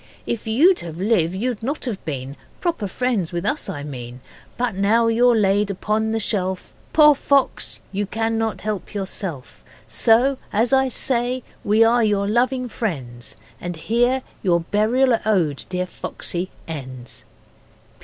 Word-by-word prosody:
If 230 -1 -3
you 260 +11 +5
had 165 -2 -7
lived 185 -3 +1
you'd 235 +2 -2
not 275 +6 -3
have 220 -6 -4
been 135 -4 -4
(Been 140 - -12 0.2
proper 335 - -1
friends 215 -4 -1
with 175 -1 -3
us, 300 - 0
I 145 - -5
mean), 125 -4 -7 0.4
But 245 -2 0
now 205 +5 +3
you're 235 +1 +4
laid 205 -1 +2
upon 215 +3 -1
the 225 - 0
shelf, 190 -3 -2 0.2
Poor 300 -1 +7
fox, 280 -1 +1
you 200 +1 -2
cannot 225 0 -1
help 210 -1 -4
yourself, 190 -8 -5 0.2
So, 255 +4 +3
as 230 +5 +2
I 265 0 +4
say, 250 0 0 0.2
we 215 +2 +4
are 235 +1 +4
your 205 -2 +1
loving 250 +3 +1
friends 130 - -5 0.2
And 175 0 -5
here 245 +9 +1 0.2
your 170 -3 +2
Burial 225 +7 +2
Ode, 175 -10 +1
dear 180 0 -1
Foxy, 180 0 -4 0.2
ends. 130 -6 -7
215 Hz, 150 wpm, -22 LUFS, 180-240 Hz, 0.4 s, Poor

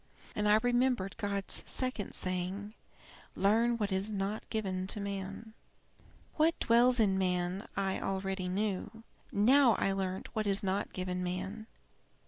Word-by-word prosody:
And 210 0 +1
I 210 - +7
remembered 245 -5 +1
God's 200 -3 -1
second 255 -6 -3
saying, 185 +3 -3 0.6
'Learn 230 +4 +3
what 210 -3 -1
is 190 +3 0
not 200 +1 -3
given 190 -4 -2
to 210 - -5
man.' 200 +2 -5 0.8
"What 325 +1 +3
dwells 245 +2 +4
in 195 -3 +3
man 180 +1 -1
I 195 -1 0
already 190 -1 -2
knew. 205 +3 -2 0.3
Now 240 +4 +5
I 195 - +1
learnt 190 -1 -3
what 215 -1 0
is 200 0 +2
not 195 +1 -1
given 180 0 -3
him. 190 +5 -4
200 Hz, 135 wpm, -32 LUFS, 190-220 Hz, 0.8 s, I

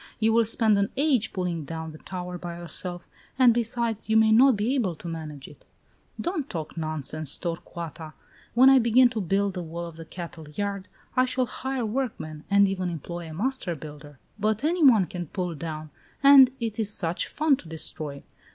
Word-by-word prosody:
You 220 0 +3
will 230 0 +4
spend 220 -2 +3
an 200 - +1
age 275 -6 +2
in - - -25
pulling 180 -4 -2
down 160 +2 -6
the 155 - -12
tower 180 -1 -6
by 170 -1 -6
yourself, 175 +1 -2 0.3
and 250 -3 +6
besides, 230 -1 -2
you 220 - +4
may 220 0 +5
not 250 +1 +6
be 220 +6 0
able 210 -11 0
to 170 - -10
manage 155 -4 -7
it." - - -16 0.6
"Don't 335 -5 -2
talk 160 -3 -5
nonsense, 155 -2 -2
Torcuata. 165 -2 -6 0.4
When 255 +2 +7
I 270 -1 +8
begin 245 +2 +5
to 225 -2 -3
build 195 +2 0
the 180 - -4
wall 170 +1 -6
of 165 -1 -10
the 165 - -9
cattle 165 -2 -9
yard, 200 +4 -4 0.3
I 255 - +4
shall 255 0 0
hire 260 +1 -3
workmen, 210 - -4
and 200 0 +5
even 185 -2 -2
employ 170 +1 -6
a - - -8
master 220 -3 -2
builder. 145 -1 -11 0.2
But 215 +3 0
any 335 +2 +1
one 225 -9 +6
can 175 0 -6
pull 180 +2 -3
down. 155 0 -6 0.3
And 275 -2 +9
it 225 -2 -3
is 215 -2 +1
such 170 -4 -1
fun 300 -3 +2
to 170 - -13
destroy! 155 -2 -6
190 Hz, 195 wpm, -26 LUFS, 165-235 Hz, 0.6 s, And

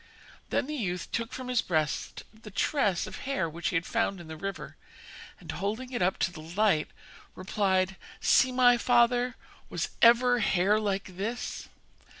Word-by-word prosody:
Then - - 0
the 300 - -5
youth 180 - -3
took 230 +1 -2
from 255 -1 -6
his 250 -2 +2
breast 155 -4 -2
the 220 0 -12
tress 200 - +1
of - - -8
hair 275 -11 -2
which 165 +2 -4
he 180 - -1
had 165 0 +1
found 225 -5 -1
in 170 - -10
the 160 - -7
river, 195 +5 -6 0.6
and - - -7
holding 220 +6 -4
it 245 - -3
up 180 +1 +2
to - - +1
the 165 -3 -10
light, 170 0 +1 0.5
replied: 190 0 0 0.2
'See, 260 - +4
my 245 -1 +5
father, 245 +1 +3 0.3
was - - -2
ever 245 +1 +6
hair 195 +1 +2
like 195 -3 -3
this? 230 +5 -4
210 Hz, 165 wpm, -28 LUFS, 180-245 Hz, 0.6 s, ever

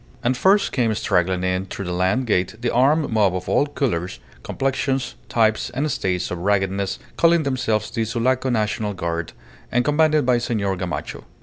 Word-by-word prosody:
And 125 +2 +2
first 195 +10 +3
came 120 -4 +1
straggling 90 -1 0
in 95 +1 -1
through 100 - -6
the 90 - -3
land 95 +9 +1
gate 95 -2 0
the 120 0 -1
armed 140 +5 +3
mob 105 -5 +2
of 90 0 -5
all 145 - +2
colours, 90 - -2 0.2
complexions, 135 0 -1 0.2
types, 110 -2 +2
and 145 +3 0
states 90 -5 -1
of 90 - -3
raggedness, 95 0 0 0.2
calling 170 -1 +4
themselves 125 -6 -1
the 115 - -1
Sulaco 125 +4 0
National 105 -2 -1
Guard, 85 -1 -3 0.4
and 125 +1 +1
commanded 155 -1 +3
by 125 -1 +3
Senor 105 -5 -1
Gamacho. 90 -5 -5
110 Hz, 170 wpm, -22 LUFS, 95-130 Hz, 0.4 s, calling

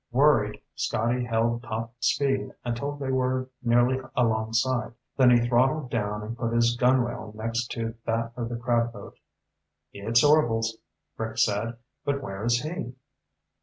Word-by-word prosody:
Worried, 120 -6 +3
Scotty 120 +2 0
held 115 0 0
top 115 0 -5
speed 135 +1 0
until 120 +4 -2
they 135 -2 -3
were 130 0 0
nearly 120 +2 +3
alongside, 115 +1 +1 0.2
then 130 -2 +6
he 120 -1 +4
throttled 130 +3 +2
down 105 -2 -2
and 115 +2 -5
put 115 -1 -2
his 120 0 +3
gunwale 125 -3 +1
next 115 +2 -2
to 115 -1 -3
that 115 0 0
of 120 -1 -3
the 120 - -3
crab 120 0 +1
boat. - - -11 0.7
"It's 115 +4 +2
Orvil's," 115 -7 +3 0.4
Rick 110 0 -4
said. 115 +1 +1 0.3
"But 140 -1 -1
where 95 -3 -5
is 120 +2 +2
he?" 155 -6 -5
120 Hz, 145 wpm, -26 LUFS, 115-130 Hz, 0.7 s, then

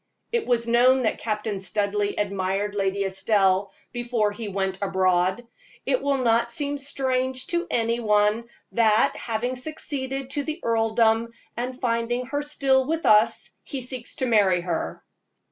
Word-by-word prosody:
It 470 -2 -1
was 235 -1 +1
known 250 +2 +4
that 220 - 0
Captain 210 -2 -2
Studleigh 205 +1 -1
admired 200 0 -1
Lady 200 0 0
Estelle 195 0 +1 0.2
before 240 -3 0
he 220 +1 -6
went 190 -1 -2
abroad; 190 +2 +1 0.4
it - - +1
will 280 -1 +1
not 235 -1 +2
seem 285 +3 -2
strange 260 -2 -1
to 345 +1 0
any 230 -3 0
one 210 0 +2 0.3
that, 220 -1 +3
having 240 +3 -2
succeeded 270 -1 -5
to 290 +1 -2
the 310 +3 -4
earldom, 225 0 +2 0.2
and 250 +2 -4
finding 240 0 0
her 285 +3 -2
still 275 -3 +2
with 325 +1 -1
us, 215 +2 +4
he 275 -3 -5
seeks 250 -1 -7
to 260 - -1
marry 200 -7 +3
her. 175 -2 -3
230 Hz, 145 wpm, -25 LUFS, 205-260 Hz, 0.4 s, known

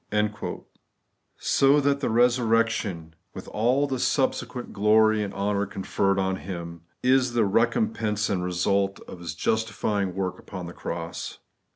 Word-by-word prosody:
* 105 0 -5
So 140 +2 +4
that 140 0 +2
the - - -1
resurrection, 115 -7 +1 0.2
with - - -8
all 125 +6 +2
the 135 -3 -3
subsequent 130 -2 -1
glory 110 +1 +4
and 100 -1 -3
honour 100 0 -1
conferred 95 0 0
on 95 -1 0
Him, 85 -3 -7 0.2
is 130 -1 +3
the 115 -2 +3
recompense 110 - +1
and 95 -3 -1
result 95 +2 0
of 90 - -10
his 85 -2 -6
justifying 105 -2 -1
work 95 -1 -2
upon 90 -2 -7
the 85 - -8
cross. 85 0 -5
105 Hz, 140 wpm, -26 LUFS, 95-120 Hz, 0.2 s, So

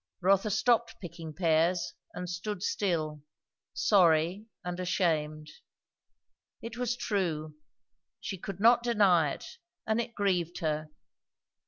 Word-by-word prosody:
Rotha 195 +3 +3
stopped 225 +2 +2
picking 170 -3 -8
pears 165 -1 +1 0.2
and 180 0 -4
stood 180 +2 -4
still, 155 -8 -1 0.5
sorry 180 +1 +3 0.2
and 180 0 -4
ashamed. 155 -4 -1 1.1
It 230 0 -7
was 245 0 -1
true; 160 -9 -2 0.7
she 190 - -5
could 195 0 -6
not 235 +3 +6
deny 200 -10 +4
it; - - -10 0.3
and 220 +2 +1
it 235 0 -7
grieved 180 -4 0
her. 155 -2 -2
180 Hz, 115 wpm, -30 LUFS, 160-210 Hz, 1.1 s, not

